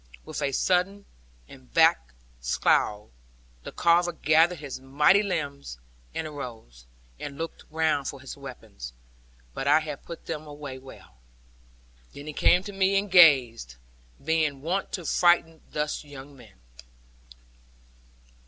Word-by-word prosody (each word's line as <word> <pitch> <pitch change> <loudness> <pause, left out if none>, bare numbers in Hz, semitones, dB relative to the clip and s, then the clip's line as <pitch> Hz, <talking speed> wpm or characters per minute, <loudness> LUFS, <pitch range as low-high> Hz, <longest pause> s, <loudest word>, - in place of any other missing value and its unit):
With - - -6
a 140 -1 0
sullen 185 +7 0 0.4
and 65 -1 -16
black - - +3 0.2
scowl, 105 - +1 0.5
the - - -8
Carver 175 +1 +2
gathered 165 +3 +3
his 140 -4 -7
mighty 150 +9 +3
limbs, 140 - -4 0.4
and - - -2
arose, 115 - -9 0.3
and 140 -1 -7
looked 165 +2 -6
round 155 -3 0
for 140 - -6
his 130 - -9
weapons; 110 - -10 0.6
but 135 - -4
I 150 +2 +6
had 150 -3 -6
put 170 - -10
them 155 -1 -5
well 145 -1 -10 0.2
away. 130 0 -12 1.1
Then 140 - -9
he 155 - -6
came 180 +5 +4
to 205 0 -8
me 195 0 +2
and 200 -1 -1
gazed; 130 - +5 0.5
being 155 -4 0
wont 185 +5 -2
to 180 - -4
frighten 165 -1 +2
thus 150 0 -3
young 140 -1 -12
men. 115 - -17
150 Hz, 135 wpm, -26 LUFS, 130-170 Hz, 1.1 s, I